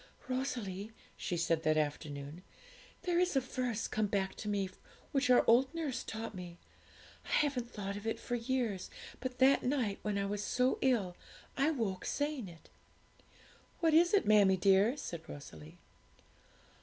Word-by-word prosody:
'Rosalie,' 230 -6 -3 0.2
she 175 - -3
said, 165 -1 +1
that 155 -1 +2
afternoon, 145 +1 -3 0.6
'there 350 -1 +1
is 360 -4 +2
a - - +6
verse 250 -3 -2
come 215 -1 0
back 195 -1 -1
to 210 - -7
me 200 -2 0 0.4
which 275 -1 +1
our 250 - +6
old 250 +3 +5
nurse 285 -7 -2
taught 225 0 -5
me; 180 -2 -8 0.7
I - - -14
haven't 265 -5 +1
thought 200 -3 -5
of 205 +2 -6
it 225 - -1
for - - -5
years, 235 -5 -1 0.3
but 255 -1 -4
that 270 +2 +5
night 245 -7 0
when 210 -1 -1
I 200 - 0
was 205 +1 -2
so 250 +4 +1
ill 215 -9 +2 0.4
I 275 +3 +3
woke 220 -11 -2
saying 290 -6 -2
it.' 165 -2 -14 1.1
'What 325 -2 +3
is 345 +2 +6
it, 405 - +3
mammie 205 -3 +5
dear?' 200 +7 +4
said 170 - -5
Rosalie. 80 - -10
220 Hz, 160 wpm, -34 LUFS, 190-260 Hz, 1.1 s, a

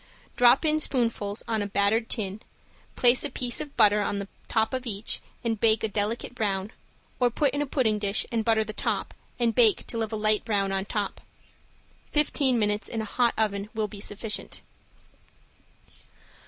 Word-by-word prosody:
Drop 245 +5 +5
in 310 0 +3
spoonfuls 230 -7 -1
on 220 -2 0
a 205 - -2
buttered 200 +3 +1
tin, 205 -2 -3 0.5
place 245 0 +5
a 295 - -1
piece 245 -2 -2
of 290 -2 -8
butter 210 -2 +5
on 205 - -1
the 200 0 -4 0.2
top 220 +2 0
of 255 -1 -3
each 210 0 0 0.2
and 225 -3 -1
bake 220 -1 +3
a - - +2
delicate 215 +4 -2
brown 205 -3 -2 0.5
or 250 -1 +4
put 275 +3 0
in 285 - -1
a 290 - -2
pudding 225 -6 +1
dish 200 0 0
and 230 -2 0
butter 220 -1 +2
the 215 0 -6
top - - -2 0.2
and 235 -2 +1
bake 225 -2 +4
till 230 - -4
of 220 0 -3
a - - -2
light 215 0 +2
brown 200 -3 0
on 195 0 -1
top. 205 -1 -3 0.9
Fifteen 285 -4 +2
minutes 210 -1 0
in 225 - -4
a - - -4
hot 240 +2 +1
oven 205 -2 -1
will 215 -1 0
be 205 0 -10
sufficient. 210 +1 -3
220 Hz, 180 wpm, -26 LUFS, 205-240 Hz, 0.9 s, Drop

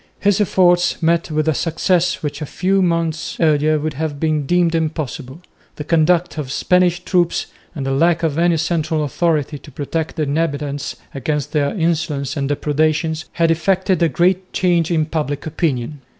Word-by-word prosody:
His 205 0 +2
efforts 180 -2 +3
met 170 +1 +2
with 155 0 -1
a 160 - +3
success 170 +3 0
which 150 +1 -4
a 150 - -4
few 190 +5 +1
months 165 -3 -1
earlier 155 -1 +3
would 155 +1 -3
have 150 0 -4
been 155 -3 0
deemed 175 0 +2
impossible. 155 -3 -3 0.3
The 150 - -5
conduct 165 +1 +2
of 145 - -4
the - - -7
Spanish 180 +3 +2
troops, 175 -3 +1 0.3
and 140 -4 -4
the 135 - -1
lack 165 +5 +2
of 155 -3 0
any 170 -1 +3
central 160 -1 0
authority 150 -1 -1
to - - -14
protect 155 +4 -3
the 160 - -1
inhabitants 145 -1 -2 0.2
against 145 +1 -2
their 150 +5 0
insolence 160 -5 -1
and 140 -2 -2
depredations, 155 +2 0
had 165 -1 +2
effected 185 +2 +1
a 165 - +4
great 185 +5 +1
change 175 -3 +2
in 160 -3 +1
public 150 -3 -3
opinion. 150 -3 -2
160 Hz, 170 wpm, -19 LUFS, 150-170 Hz, 0.3 s, a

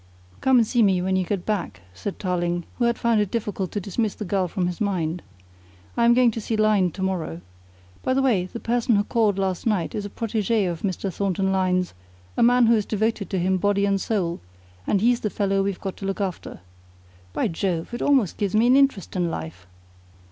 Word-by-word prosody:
"Come 265 -1 +4
and 235 - +5
see 240 +2 +1
me 195 -4 +4
when 190 +1 0
you 185 - +2
get 180 0 -3
back," 175 - -2
said 200 - -5
Tarling, 175 -2 -1
who 240 - +3
had 235 0 +1
found 230 -2 +2
it 205 - -1
difficult 205 -4 -3
to 205 - -1
dismiss 205 +2 -2
the 210 - -5
girl 190 0 0
from 180 +1 -2
his 180 +1 -4
mind. 180 -4 -1 0.7
"I 235 - +3
am 235 0 +6
going 250 -1 +5
to 225 - -5
see 220 +1 -2
Lyne 215 -4 +3
to 190 - -5
morrow. 175 - -2 0.6
By 260 - 0
the 270 - +3
way, 215 -9 +2
the 235 - -6
person 235 0 +1
who 205 - +3
called 210 -2 +1
last 190 +1 -1
night 200 -7 0
is 210 - -3
a 205 - -5
protégé 220 -1 0
of 170 -2 -4
Mr. 190 -1 -2
Thornton 190 0 0
Lyne's, 185 -1 +1 0.4
a - - 0
man 245 +1 +5
who 230 - +5
is 215 -3 +1
devoted 220 -1 -1
to 190 - -1
him 185 +1 +1
body 200 +1 +1
and 195 -1 +1
soul, 180 -6 -1 0.5
and 195 - +2
he's 240 +2 +3
the 210 - -2
fellow 195 -1 0
we've 195 -1 -2
got 195 -2 -5
to 195 - -6
look 195 - -3
after. 185 - -4 0.7
By - - 0
Jove! 170 +1 -2
It 240 - -4
almost 265 - +2
gives 200 -1 -1
me 220 +2 +4
an 250 +2 +5
interest 270 -11 +1
in 175 -2 0
life!" 85 - -7
200 Hz, 220 wpm, -24 LUFS, 185-225 Hz, 0.7 s, am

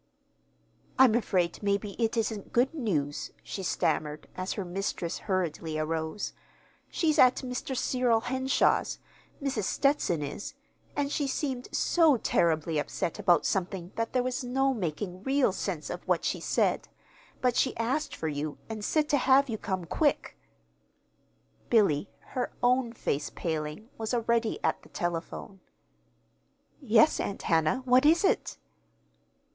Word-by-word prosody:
"I'm 260 -4 +7
afraid, 185 -7 0
maybe, 200 0 0
it 225 +1 0
isn't 220 -2 -2
good 250 +6 +2
news," 160 - -2
she 195 - -5
stammered, 155 -4 -1
as 185 +1 -3
her 200 - -4
mistress 175 -2 -3
hurriedly 165 -4 -1
arose. 160 +4 -2 0.6
"She's 310 -2 +1
at 255 0 +7
Mr. 250 +1 -4
Cyril 245 -3 +2
Henshaw's 260 +2 +1 0.5
Mrs. 250 -8 -1
Stetson 275 - +1
is 145 +8 -6 0.4
and 285 -1 -1
she 290 -2 0
seemed 265 -2 -2
so 320 -6 +4
terribly 160 -6 +1
upset 160 +2 -3
about 175 -1 +3
something 185 -1 -2
that 230 0 -2
there 250 -1 +1
was 255 +1 -2
no 270 +2 +1
making 180 - -4
real 270 0 +2
sense 185 -4 -4
out - - -4
of - - -28
what - - +1
she - - 0
said. - - +1 0.5
But 250 -1 +1
she 260 - +1
asked 255 +7 -1
for 160 - -3
you, 150 0 -3
and 220 -2 -6
said 305 +6 +1
to 290 - +4
have 270 +1 +4
you 220 -2 -3
come 185 -3 -3
quick." 290 - 0 1.3
Billy, 200 -8 +3 0.2
her 250 -1 -1
own 250 -1 +3
face 145 -10 -2
paling, 155 +4 -4
was 220 +2 -1
already 235 - +1
at - - +1
the - - -18
telephone. 175 +3 -4 1.2
"Yes, 245 +4 +4
Aunt 200 - -3
Hannah. 165 +10 +2
What 255 0 +5
is 330 +4 +5
it?" 385 - +1
220 Hz, 140 wpm, -29 LUFS, 170-255 Hz, 1.3 s, I'm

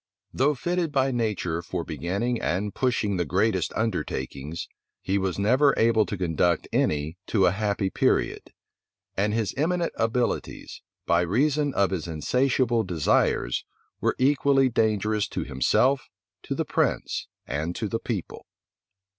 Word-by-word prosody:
Though 145 +3 +2
fitted 175 +3 -1
by 135 -1 +2
nature 105 -8 -1
for 85 - -4
beginning 100 +8 -2
and 100 +5 -1
pushing 115 -6 0
the 90 - +1
greatest 95 +3 +1
undertakings, 75 - -3 0.3
he 100 +1 0
was 95 -2 -1
never 130 +8 +4
able 110 -1 +3
to 100 - -4
conduct 85 -1 +1
any 75 +4 0
to 100 -4 +3
a - - +4
happy 100 -1 -1
period; - - 0 0.6
and 105 +2 +1
his 110 -1 -1
eminent 170 +3 0
abilities, 115 +2 -2 0.2
by 85 0 +3
reason 140 - +1
of 100 -1 +2
his 90 -3 -3
insatiable 120 - +1
desires, 80 - +1 0.4
were - - +1
equally 135 0 +3
dangerous 110 -2 +1
to - - -3
himself, 130 - +1 0.3
to - - -4
the - - -1
prince, - - -1 0.2
and 80 +5 -3
to 110 - -2
the 115 +3 -2
people. 105 -8 -5
105 Hz, 140 wpm, -26 LUFS, 90-125 Hz, 0.6 s, never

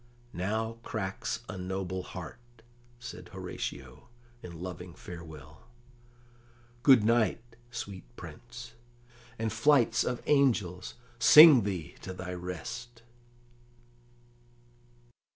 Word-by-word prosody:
"Now 110 +5 -2
cracks 100 -5 -4
a 95 - -6
noble 95 0 -3
heart," 90 +2 -8 0.6
said 120 - -9
Horatio 65 - -7 0.3
in 85 -2 -9
loving 90 -1 -7
farewell. 80 - -11 1.1
"Good 130 -4 +7
night, 115 +1 +1
sweet 100 - -7
Prince; - - -10 0.6
and 110 -1 -2
flights 125 +2 +4
of 125 -1 -3
angels 110 -11 +1 0.2
sing 150 -2 +9
thee 90 -6 -4
to 95 - -6
thy 90 0 -6
rest!" 90 +7 -7
100 Hz, 90 wpm, -30 LUFS, 90-115 Hz, 1.1 s, sing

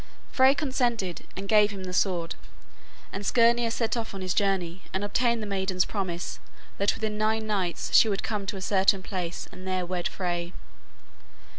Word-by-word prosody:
Frey 265 +1 +5
consented 240 - -1
and 195 - -5
gave 210 0 +5
him 195 -2 -6
the 180 0 -5
sword, 175 -3 +1 0.8
and 195 - -4
Skirnir 235 +2 +4
set 230 0 -1
off 225 -4 -4
on 195 - -5
his 185 -1 -1
journey 190 -3 0
and 190 +2 -2
obtained 235 +2 +1
the - - -3
maiden's 190 -2 0
promise 180 -4 -4 0.4
that 200 +1 +2
within 215 -1 -3
nine 220 +1 +1
nights 195 -5 -2
she 225 - +7
would 200 -2 -1
come 205 -3 -3
to 200 - -3
a - - -7
certain 190 0 +3
place 180 -3 -4
and 185 0 -10
there 185 -1 -1
wed 175 0 -2
Frey. 175 -1 -3
195 Hz, 175 wpm, -27 LUFS, 185-220 Hz, 0.8 s, she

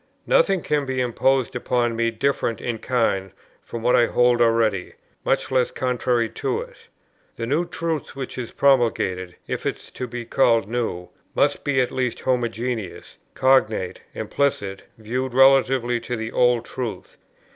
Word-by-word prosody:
Nothing 195 -4 +3
can 145 -2 0
be 130 -1 -2
imposed 125 +1 +1
upon 120 -1 0
me 115 0 +1
different 115 0 -1
in 115 -2 -3
kind 110 -7 0 0.3
from 115 -1 -7
what 125 +1 +4
I 120 -1 +4
hold 120 -1 +3
already, 115 -5 +2 0.3
much - - 0
less 130 -2 +2
contrary 125 -2 0
to - - -2
it. - - -10 0.6
The 115 - -4
new 150 +8 +1
truth 165 -5 -4
which 135 -2 -5
is 125 -3 -5
promulgated, 110 -9 +1
if - - -4
it - - -1
is - - -16
to 125 - -5
be 120 0 -6
called 115 -3 +3
new, 110 -7 -3 0.3
must - - +2
be 140 -2 +1
at 125 - -1
least 125 -2 -2
homogeneous, 120 -4 -2 0.2
cognate, 115 -8 +2
implicit, 100 -9 -2
viewed 125 +3 -3
relatively 130 -2 +4
to 120 +1 -4
the 110 0 -4
old 120 -1 +3
truth. 125 -4 -6
120 Hz, 155 wpm, -23 LUFS, 115-130 Hz, 0.6 s, what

